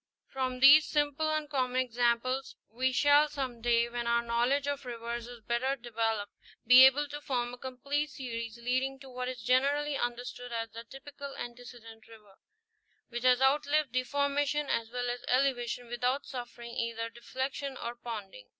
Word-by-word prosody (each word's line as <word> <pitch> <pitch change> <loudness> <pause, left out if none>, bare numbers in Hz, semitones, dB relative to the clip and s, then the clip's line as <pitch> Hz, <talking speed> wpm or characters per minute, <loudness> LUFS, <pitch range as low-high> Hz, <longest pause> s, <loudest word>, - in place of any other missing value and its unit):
From 255 -1 -3
these 290 +3 +9
simple 295 +1 +1
and 310 -1 -1
common 255 -3 0
ex 235 -2 -19
amples, 245 +2 +1 0.2
we 260 +3 0
shall 290 +3 +5
some 260 -5 -4
day, 235 0 +3
when 240 0 -4
our 235 0 +2
knowledge 240 +4 +1
of 285 -1 -2
rivers 235 -1 -5
is 245 -1 -11
better 240 +4 0
developed, 225 -4 -2 0.3
be 250 +2 +9
able 290 +3 +1
to 295 0 -6
form 245 -3 -2
a - - -8
complete 280 +4 -2
series 230 -5 -6
leading 260 +3 -1
to 265 -1 -11
what 250 0 -3
is 250 -3 -7
generally 280 +4 +2
understood 245 0 -4
as 225 -1 -3
the 230 +1 -9
typical 280 +2 -9
antecedent 240 -2 -10
river, 210 -4 -17 0.7
which 240 0 -5
has 250 0 +4
outlived 290 0 +2
deformation 285 +3 0
as 225 -1 -1
well 245 +1 -3
as 245 0 -3
elevation 250 -2 +1
without 245 +3 -1
suffering 240 -2 -7
either 230 -1 -3
deflection 265 +3 -4
or 235 - -4
ponding. 210 - -8
250 Hz, 165 wpm, -30 LUFS, 235-275 Hz, 0.7 s, these